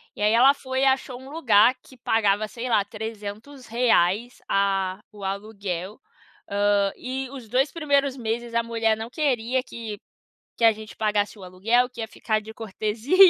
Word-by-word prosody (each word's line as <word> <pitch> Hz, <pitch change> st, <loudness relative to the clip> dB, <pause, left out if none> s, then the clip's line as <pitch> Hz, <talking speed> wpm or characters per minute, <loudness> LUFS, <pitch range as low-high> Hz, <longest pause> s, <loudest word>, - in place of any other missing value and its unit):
E -, -, -8 dB
aí, 210 Hz, +1 st, +4 dB
ela 255 Hz, +4 st, +7 dB
foi 260 Hz, -2 st, -3 dB
e -, -, +4 dB
achou 265 Hz, -2 st, +1 dB
um 265 Hz, -, -11 dB
lugar 250 Hz, -6 st, +4 dB
que 260 Hz, -, -17 dB
pagava, 215 Hz, -2 st, +2 dB
sei 240 Hz, +3 st, -5 dB
lá, 220 Hz, -4 st, +4 dB
R$300, 225 Hz, 0 st, -1 dB
ah, 195 Hz, -1 st, +1 dB
o 205 Hz, -2 st, -11 dB
aluguel, 195 Hz, -1 st, -4 dB, 0.5 s
hã, 200 Hz, 0 st, +2 dB
e 260 Hz, +1 st, -4 dB
os 255 Hz, -5 st, -9 dB
2 260 Hz, +5 st, +2 dB
primeiros 280 Hz, -4 st, +1 dB
meses 235 Hz, 0 st, -3 dB
a 235 Hz, -, +3 dB
mulher 225 Hz, -1 st, +1 dB
não 225 Hz, +1 st, -6 dB
queria 255 Hz, -3 st, 0 dB
que 225 Hz, -5 st, -7 dB, 0.6 s
que 230 Hz, -, +3 dB
a 225 Hz, -, +8 dB
gente 215 Hz, 0 st, -11 dB
pagasse 210 Hz, -1 st, 0 dB
o -, -, -10 dB
aluguel, 225 Hz, +7 st, +1 dB
que 245 Hz, -2 st, -8 dB
ia 225 Hz, -, -3 dB
ficar 220 Hz, 0 st, -1 dB
de 220 Hz, +1 st, -10 dB
cortesia, 220 Hz, -, -2 dB
225 Hz, 170 wpm, -25 LUFS, 205-250 Hz, 0.6 s, a